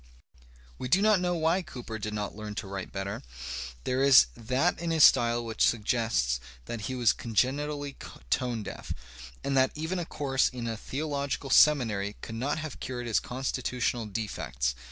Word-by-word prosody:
We 125 - -3
do 180 +9 +4
not 210 -1 +4
know 180 -1 0
why 165 +3 +2
Cooper 120 -8 -7
did 105 0 -4
not 105 -1 -3
learn 105 -1 -6
to - - -4
write 95 -1 -6
better. 95 0 -4
^ 60 +1 -7
There 130 +1 0
is 135 - +8
that 130 +9 0
in 170 0 -2
his 160 -2 +4
style 120 0 +5
which 110 -1 0
suggests 110 - +1 0.3
that 115 -2 -5
he 130 - -2
was 120 -4 +4
con 115 -2 -8
genitally 145 +3 0 0.4
tone 120 -4 0
deaf, - - -6 0.5
and 140 - 0
that 130 0 +5
even 160 +4 -2
a 175 - -3
course 135 -2 +1
in 125 -2 -6
a 115 -1 -2
theological 140 +2 -3
seminary 110 -9 +4
could 110 - -7
not 130 +7 -1
have 155 -2 -6
cured 125 -1 -4
his 115 -3 +2
constitutional 125 -2 -2
defects. 95 - -2
125 Hz, 175 wpm, -29 LUFS, 110-140 Hz, 0.5 s, is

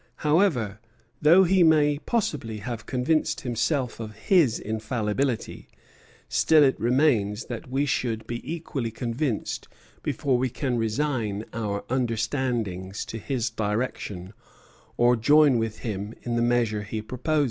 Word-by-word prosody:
However, 150 - +2 0.4
though 170 +5 +7
he 185 +1 +3
may 150 -3 +4
possibly 145 - -2
have 115 +1 -6
convinced 135 +5 0
himself 125 +1 -1
of 110 -2 -7
his 150 - +3
infallibility, 110 +3 -2 0.6
still 155 -2 +4
it 135 -5 +2
remains 120 -4 +2
that 120 +1 -7
we 135 +3 +1
should 115 -5 -1
be 120 0 -5
equally 150 -7 -3
convinced 115 +2 -3 0.3
before 130 -3 0
we 130 0 +1
can 125 +1 -2
resign 115 -3 -1
our 105 -3 -3
understandings 115 -6 -2
to 115 - -6
his 120 -1 -2
direction, 105 -3 -3 0.6
or 120 +1 +5
join 145 +2 +5
with 110 -1 -3
him 105 0 -4
in 120 -1 -2
the 120 - +1
measure 120 -3 +1
he 105 +1 -5
proposes." 135 +7 -1
120 Hz, 130 wpm, -26 LUFS, 110-140 Hz, 0.6 s, though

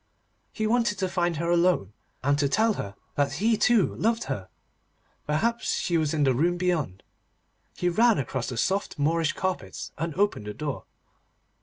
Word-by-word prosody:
He 215 - -2
wanted 230 -2 +2
to 190 -1 0
find 175 -2 0
her 170 +2 0
alone, 170 - +2 0.3
and 140 +2 +3
to 140 -1 +2
tell 220 +8 +3
her 100 - -6 0.2
that 140 -1 0
he 220 +10 +2
too 225 -2 +3
loved 230 +2 +1
her. 95 -2 -5 0.8
Perhaps 230 +11 0
she 175 - -1
was 155 -3 +2
in 150 -2 +1
the 135 -2 +4
room 170 +7 +1
beyond. 170 - -1 0.7
He 180 - -1
ran 225 +6 +4
across 130 -1 -2
the 125 - -5
soft 195 - 0
Moorish 160 +2 +1
carpets, 185 -1 -4
and 165 -1 -2
opened 195 - 0
the 105 - -5
door. 145 0 -4
170 Hz, 170 wpm, -26 LUFS, 140-200 Hz, 0.8 s, the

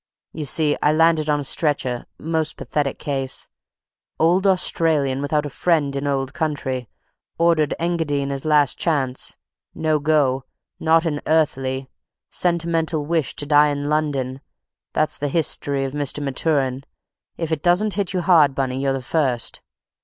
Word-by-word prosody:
You 155 -1 -5
see 150 +1 +2
I 150 - +4
landed 160 -1 +3
on 150 0 +2
a - - -3
stretcher—most 150 +2 -1
pathetic 145 -2 -2
case—old 155 +6 -2
Australian 155 -7 +1
without 150 +1 0
a - - -4
friend 150 -3 +1
in 140 +1 -2
old 135 -1 -1
country—ordered 150 +3 -2
Engadine 160 -5 -1
as 135 -1 -3
last 150 -3 +2
chance—no 150 +1 -2
go—not 150 +3 0
an 150 -3 -1
earthly—sentimental 160 +3 -1
wish 160 -4 -1
to 145 - -1
die 150 0 +5
in 145 0 -2
London—that's 145 0 -3
the 145 - -1
history 140 -3 0
of 135 - -5
Mr. 145 -1 -1
Maturin. 135 -1 0 0.5
If 165 -1 -3
it 155 -2 -1
doesn't 185 +5 +3
hit 200 -3 -2
you 180 -1 -1
hard, 160 -7 +4
Bunny, 130 -1 -1
you're 135 -1 +1
the 135 -1 -4
first. 130 -3 -1
150 Hz, 130 wpm, -21 LUFS, 135-160 Hz, 0.5 s, die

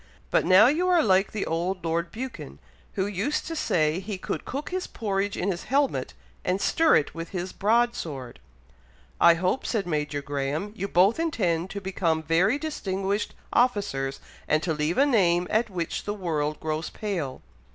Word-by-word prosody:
"But - - +3
now 190 +4 +8
you 315 +8 +2
are 350 -3 +4
like 190 -2 +3
the 210 - -2
old 175 +2 -2
Lord 170 +1 -1
Buchan, 225 - -7 0.4
who 190 - 0
used 205 +9 -1
to 330 - -4
say 155 - +1
he 195 +1 -5
could - - -4
cook 280 +3 -5
his 370 0 -2
porridge 200 -2 -2
in 195 +2 0
his 175 - -5
helmet, 260 - 0 0.3
and 185 +2 0
stir 325 +9 +4
it 145 - +1
with 165 0 -6
his 185 -1 -4
broad 235 +4 +2
sword." 135 - -6 0.8
"I 170 - +7
hope," 185 +9 0
said 215 -5 -1
Major 150 -3 -2
Graham, 145 +8 -3
"you 195 -1 -3
both 195 - +4
intend 185 - 0
to 200 - -5
become 170 -4 0
very 180 - +3
distinguished 200 -9 -2 0.2
officers, 200 - +1 0.3
and 155 +1 +2
to 165 - 0
leave 150 +3 -1
a 275 - +5
name 180 -10 +3
at 225 +2 +2
which 175 -4 -3
the 205 - -2
world 155 -6 -2
grows 155 0 -3
pale." 175 -11 -4
185 Hz, 175 wpm, -26 LUFS, 165-215 Hz, 0.8 s, now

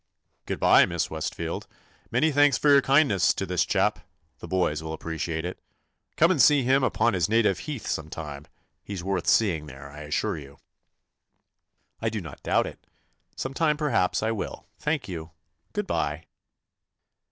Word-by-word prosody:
"Good - - -3
bye, - - +6
Miss - - -2
Westfield. - - -4 0.4
Many 160 0 +2
thanks 145 -2 +4
for 150 - +2
your 140 -1 +7
kindness 135 - +3
to - - -2
this - - +1
chap. - - +1 0.4
The - - -8
boys 90 -5 0
will 80 0 -5
appreciate 80 0 -4
it. 90 - -5 0.6
Come 170 +3 +5
and 155 -8 +3
see 145 +2 +6
him 130 +2 +3
upon 120 -2 +2
his 90 -1 +1
native 110 -4 +3
heath 145 -7 -6
some 80 0 -3
time. 75 -3 -7 0.4
He 100 - -6
's 90 - -5
worth 95 0 -2
seeing 85 -9 +2
there, 70 0 -10
I 75 - -10
assure 75 +1 -2
you." 70 -1 -13 1.4
"I 110 - 0
do 110 -1 -3
not 85 -7 -10
doubt - - +2
it. - - -10 0.5
Some 130 - -4
time 150 0 +1
per 150 -1 -1
haps 90 -8 +1
I 110 - +1
will, 110 - -5
thank 150 -2 -1
you. 85 -3 -7 0.4
Good - - -2
bye." 75 +3 -2
95 Hz, 175 wpm, -26 LUFS, -, 1.4 s, your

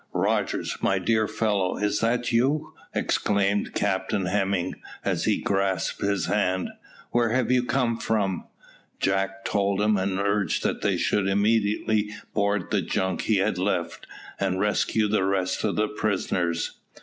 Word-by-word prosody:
Rogers, - - 0
my 95 - +2
dear 110 +3 +1
fellow, 105 -4 0
is 105 0 0
it 120 +2 +1
you?" 135 +6 +1 0.2
exclaimed 100 0 +1
Captain 95 0 0
Hemming, 95 -1 0 0.3
as - - 0
he - - +2
grasped 95 -3 -1
his 100 -2 +1
hand. 95 -3 0 0.4
"Where 120 -1 +2
have 125 +1 +1
you 125 -1 +3
come 125 -2 0
from?" 100 -5 0 0.5
Jack 95 0 0
told 100 -1 +1
him, 105 0 +3
and 95 0 -1
urged 100 -2 0
that - - -1
they - - +1
should 100 -2 +1
immediately 105 +1 +2 0.2
board 100 -2 0
the - - +2
junk 95 -1 -1
he 110 - +3
had 95 -1 +1
left, 90 -3 -2 0.3
and 95 -1 0
rescue 105 +1 +1
the 105 -2 +1
rest 95 -1 0
of 105 - 0
the 105 0 +2
prisoners. 95 -6 -1
100 Hz, 150 wpm, -25 LUFS, 95-110 Hz, 0.5 s, you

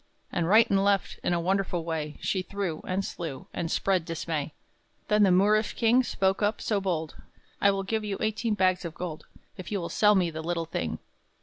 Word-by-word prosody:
And 170 -1 0
right 220 +3 +6
and 195 0 +2
left, 200 -1 +1
in - - 0
a 175 - +2
wonderful 185 -1 0
way, 155 -2 -3
She 190 - 0
threw, 185 -4 -4
and 190 +1 -1
slew, 160 -6 -6
and 165 - -3
spread 185 0 +1
dismay. 160 -2 -3 0.6
Then 210 0 +4
the 195 -2 +5
Moorish 210 +4 +3
king 235 +2 +4
spoke 195 -5 0
up 205 +1 +1
so 205 -3 0
bold: 165 -5 -2 0.4
"I 200 - +6
will 195 0 0
give 220 +2 -2
you 205 -2 -3
eighteen 215 0 0
bags 185 -2 +2
of 165 -2 -6
gold, 170 -4 -6 0.3
If 185 - -8
you 205 - 0
will 170 - -4
sell 210 -1 +4
me 180 -3 +2
the 160 0 -5
little 165 0 -2
thing." 85 - -3
190 Hz, 205 wpm, -27 LUFS, 170-205 Hz, 0.6 s, right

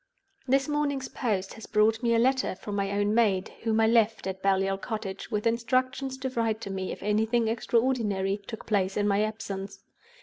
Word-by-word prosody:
"This 270 +2 +3
morning's 290 -3 -1
post 200 -6 -2
has 220 - -10
brought 220 +1 +3
me 235 -1 +2
a - - +4
letter 260 -1 +2
from 205 +2 -6
my 200 -1 0
own 205 +1 +1
maid, 210 -4 +2
whom 225 -1 +1
I 225 - +5
left 225 -2 +3
at 190 0 -4
Baliol 195 0 +1
Cottage, 205 -3 -5
with 210 0 -2
instructions 255 +3 0
to 265 0 -3
write 225 -3 0
to 195 - -5
me 190 -1 -3
if - - -7
anything 220 +3 +2
extraordinary 220 -4 0
took 225 - -7
place 195 -3 0
in 205 0 +2
my 200 0 +2
absence. 195 -2 -4
220 Hz, 190 wpm, -28 LUFS, 195-235 Hz, -, I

